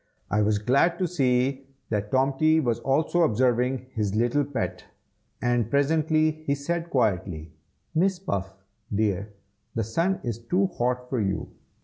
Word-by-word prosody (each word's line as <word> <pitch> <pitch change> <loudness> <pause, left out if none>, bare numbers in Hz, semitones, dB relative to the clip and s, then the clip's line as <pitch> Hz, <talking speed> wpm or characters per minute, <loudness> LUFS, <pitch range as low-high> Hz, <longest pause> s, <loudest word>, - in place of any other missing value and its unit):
I 105 - +3
was 105 0 +2
glad 140 +11 +2
to 185 - 0
see 135 -4 +1 0.2
that 105 -1 -1
Tomty 140 +4 +3
was 120 -6 0
also 155 +6 +1
observing 125 -1 +2
his 105 -2 -1
little 120 +6 +2
pet; 130 -5 -4 0.6
and 120 -2 +1
presently 155 +2 +2
he 140 - +2
said 170 +4 -3
quietly, 90 - 0 0.4
"Miss 185 +3 +2
Puff, 100 - -3 0.4
dear, 105 -1 0 0.4
the 115 - 0
sun 165 - 0
is 115 -2 -3
too 180 +12 +1
hot 125 +1 0
for 125 -3 -1
you. 95 -1 -2
130 Hz, 140 wpm, -26 LUFS, 110-155 Hz, 0.6 s, I